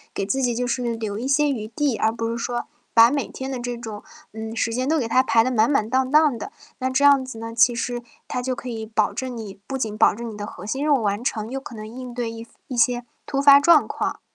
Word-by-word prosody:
给 195 Hz, -, -1 dB
自 265 Hz, +7 st, -1 dB
己 245 Hz, -2 st, +1 dB
就 250 Hz, +1 st, -1 dB
是 240 Hz, -1 st, -1 dB
留 215 Hz, -2 st, -4 dB
一 250 Hz, -, -3 dB
些 295 Hz, +2 st, +3 dB
余 235 Hz, -7 st, -2 dB
地， 270 Hz, +3 st, 0 dB
而 220 Hz, -, +2 dB
不 230 Hz, 0 st, -3 dB
是 230 Hz, -, -3 dB
说 240 Hz, -1 st, -2 dB, 0.3 s
把 230 Hz, +1 st, +7 dB
每 285 Hz, -1 st, -1 dB
天 265 Hz, 0 st, -6 dB
的 260 Hz, -, -3 dB
这 245 Hz, 0 st, -4 dB
种， 220 Hz, -3 st, -8 dB, 0.3 s
嗯， 220 Hz, +1 st, -6 dB
时 230 Hz, 0 st, 0 dB
间 255 Hz, +3 st, -1 dB
都 320 Hz, -, +3 dB
给 250 Hz, -6 st, -1 dB
它 250 Hz, +3 st, +4 dB
排 230 Hz, -3 st, +3 dB
得 255 Hz, -, -1 dB
满 225 Hz, -2 st, +3 dB
满 275 Hz, -7 st, +2 dB
当 260 Hz, +2 st, +1 dB
当 295 Hz, -4 st, +4 dB
的， -, -, -7 dB, 0.3 s
那 260 Hz, 0 st, 0 dB
这 265 Hz, +2 st, +2 dB
样 280 Hz, -2 st, +6 dB
子 255 Hz, -3 st, -8 dB
呢， 225 Hz, 0 st, -6 dB
其 235 Hz, +1 st, +4 dB
实 240 Hz, +1 st, -3 dB, 0.3 s
它 250 Hz, -, -3 dB
就 255 Hz, 0 st, -2 dB
可 255 Hz, -, -8 dB
以 225 Hz, -2 st, -5 dB
保 215 Hz, -1 st, +1 dB
证 255 Hz, -2 st, -4 dB
你 200 Hz, -3 st, -8 dB
不 270 Hz, -, -3 dB
仅 220 Hz, -5 st, -3 dB
保 -, -, +4 dB
证 235 Hz, 0 st, -6 dB
你 -, -, -9 dB
的 205 Hz, 0 st, -6 dB
核 185 Hz, -, -10 dB
心 265 Hz, +7 st, -2 dB
任 295 Hz, -1 st, +4 dB
务 235 Hz, -, -1 dB
完 205 Hz, +2 st, -1 dB
成 225 Hz, -3 st, -2 dB
又 270 Hz, -, -3 dB
可 245 Hz, -, -10 dB
能 215 Hz, 0 st, -7 dB
应 250 Hz, +2 st, -8 dB
对 235 Hz, -2 st, -2 dB
一 230 Hz, 0 st, -9 dB, 0.2 s
一 255 Hz, -, -5 dB
些 240 Hz, +1 st, +2 dB, 0.2 s
突 275 Hz, -, -1 dB
发 280 Hz, 0 st, +8 dB
状 320 Hz, +1 st, +5 dB
况。 -, -, -3 dB
240 Hz, 295 characters per minute, -23 LUFS, 225-265 Hz, 0.3 s, 发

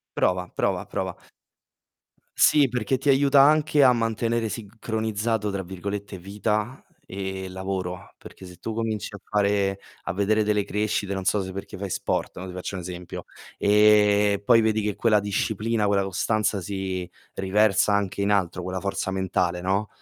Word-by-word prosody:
Prova, 90 Hz, 0 st, +1 dB
prova, -, -, -1 dB
prova. -, -, -3 dB, 1.2 s
Sì, 145 Hz, -2 st, +5 dB
perché 125 Hz, 0 st, -1 dB
ti 135 Hz, -, -6 dB
aiuta 140 Hz, 0 st, +5 dB
anche 150 Hz, 0 st, +4 dB
a 130 Hz, -2 st, +7 dB
mantenere 115 Hz, 0 st, 0 dB
"sincronizzato", 110 Hz, 0 st, -2 dB
tra 100 Hz, -1 st, -3 dB
virgolette, 100 Hz, +2 st, -5 dB
vita 105 Hz, +6 st, -2 dB, 0.2 s
e 95 Hz, 0 st, -5 dB
lavoro. 95 Hz, -1 st, -5 dB
Perché 95 Hz, -, -13 dB
se 90 Hz, -1 st, -12 dB
tu 110 Hz, +5 st, -5 dB
cominci 110 Hz, -2 st, -3 dB
a -, -, -9 dB
fare 100 Hz, -1 st, +1 dB, 0.2 s
a -, -, -3 dB
vedere 105 Hz, +3 st, +1 dB
delle 105 Hz, -1 st, +1 dB
crescite 105 Hz, -1 st, -1 dB
non 95 Hz, -1 st, -3 dB
so, 100 Hz, +2 st, +2 dB
se 95 Hz, -1 st, -6 dB
perché 100 Hz, -, -7 dB
fai 100 Hz, +1 st, -5 dB
sport, -, -, -2 dB
no, 90 Hz, -, -6 dB
ti 95 Hz, -, -7 dB
faccio 90 Hz, +1 st, -5 dB
un 90 Hz, -, -4 dB
esempio, 90 Hz, 0 st, -7 dB, 0.3 s
ehm, 105 Hz, -1 st, +4 dB
poi 115 Hz, +2 st, +6 dB
vedi 110 Hz, -1 st, +2 dB
che 105 Hz, -1 st, -2 dB
quella 105 Hz, -3 st, +3 dB
disciplina, 105 Hz, +2 st, -1 dB
quella 100 Hz, -1 st, +2 dB
costanza 100 Hz, +2 st, 0 dB
si 95 Hz, -1 st, -4 dB, 0.3 s
riversa 100 Hz, +1 st, +2 dB
anche 100 Hz, -1 st, 0 dB
in 100 Hz, +1 st, +1 dB
altro, 90 Hz, -3 st, 0 dB
quella 90 Hz, 0 st, -4 dB
forza 100 Hz, -1 st, -2 dB
mentale, 90 Hz, -2 st, -1 dB
no, 95 Hz, +3 st, 0 dB
100 Hz, 160 wpm, -25 LUFS, 95-110 Hz, 1.2 s, a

